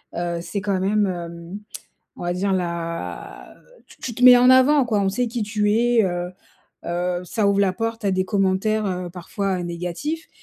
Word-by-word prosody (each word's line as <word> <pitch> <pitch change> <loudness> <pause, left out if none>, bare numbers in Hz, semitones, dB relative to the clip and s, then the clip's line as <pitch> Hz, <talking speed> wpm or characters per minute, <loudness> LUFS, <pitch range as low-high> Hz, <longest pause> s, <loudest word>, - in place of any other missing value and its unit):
heu, 170 0 -2
c'est 200 +3 -4
quand 195 -1 -1
même, 205 +2 +2
hem, 170 +1 -6 0.6
on - - -9
va 175 - 0
dire 195 +2 0
la 170 -2 -4 0.3
tu - - -18
tu 235 - -4
te 250 - -5
mets 250 -1 +10
en 250 +1 +6
avant, 260 +2 +5
quoi. 215 -3 +1
On 195 - +1
sait 240 +4 -1
qui 235 -1 -3
tu 210 0 0
es, 235 +1 +3
heu 175 -1 -2 0.6
heu, 175 +1 -1
ça 205 +2 0
ouvre 200 0 +2
la 195 -2 +2
porte 225 +1 -3
à 200 - +2
des 185 0 +1
commentaires, 205 +2 +1
heu, 180 -2 -3
parfois 185 +1 -3
négatifs 180 - -4
195 Hz, 190 wpm, -22 LUFS, 175-225 Hz, 0.6 s, mets